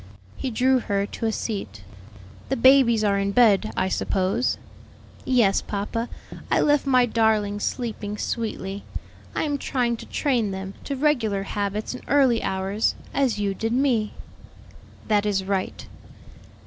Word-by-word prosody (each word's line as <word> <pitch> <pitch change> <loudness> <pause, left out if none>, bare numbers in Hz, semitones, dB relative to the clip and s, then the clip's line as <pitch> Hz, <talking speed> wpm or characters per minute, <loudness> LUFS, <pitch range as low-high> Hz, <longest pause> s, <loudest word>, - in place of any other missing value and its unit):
He 265 - -3
drew 255 +2 +3
her 200 -4 -1
to 225 +2 -4
a - - +1
seat. 110 - -4 0.7
"The 270 - 0
babies 235 -3 +5
are 200 -1 +2
in 200 0 -1
bed, 215 -3 +4
I 185 - +1
suppose?" 190 +5 0 0.7
"Yes, 230 -7 +3
papa; 220 +3 -3 0.4
I - - +3
left 290 -2 +2
my 255 -2 +5
darlings 215 -3 +1
sleeping 215 -4 -3
sweetly. 205 -4 -3 0.5
I - - 0
am 290 -2 -1
trying 240 -3 0
to - - -10
train 245 -8 0
them 190 0 -5
to 280 - -2
regular 240 -9 +1
habits 205 +2 -3
and 250 - -9
early 265 -5 +4
hours, 190 +3 0 0.2
as 270 -6 +1
you 200 -1 0
did 225 +3 -2
me." 245 -5 +1 0.9
"That 210 -2 +3
is 195 -2 0
right." 190 -1 -3
220 Hz, 145 wpm, -24 LUFS, 200-250 Hz, 0.9 s, babies